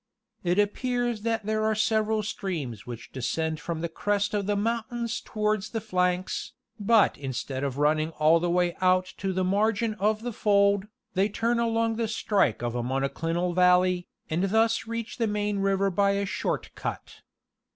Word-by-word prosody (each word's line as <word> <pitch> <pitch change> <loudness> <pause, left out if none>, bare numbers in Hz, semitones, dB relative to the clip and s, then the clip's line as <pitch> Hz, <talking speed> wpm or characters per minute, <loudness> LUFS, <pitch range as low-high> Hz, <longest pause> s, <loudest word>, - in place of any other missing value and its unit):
It 175 +1 +1
appears 240 +2 0
that 225 -1 -1
there 215 0 0
are 220 0 +2
several 215 0 +1
streams 145 - -4
which 120 -1 -8
descend 155 +5 -2
from 165 -2 -4
the 170 - -1
crest 205 +5 -1
of 200 -2 -1
the 205 - +1
mountains 230 +2 -2
towards 210 -1 -1
the 225 - -2
flanks, 180 -3 -1 0.3
but 215 +1 +3
instead 130 0 -4
of 135 -2 -2
running 155 +2 +2
all 155 +2 +5
the 175 +1 -1
way 175 0 +1
out 185 0 +2
to 195 0 -2
the 185 0 0
margin 215 +4 +1
of 215 +2 +1
the 245 -1 -3
fold, 200 -1 +3 0.3
they 195 +2 +2
turn 230 +3 0
along 230 -1 +1
the 230 -1 0
strike 205 - +1
of 120 -1 -1
a 120 - -1
monoclinal 165 +8 -1
valley, 180 0 +3 0.2
and 170 +5 0
thus 225 +3 +2
reach 230 0 -5
the 230 - +2
main 210 -1 -1
river 195 0 +1
by 200 +2 +2
a 200 0 0
short 190 - -3
cut. - - -6
200 Hz, 170 wpm, -27 LUFS, 175-220 Hz, 0.3 s, all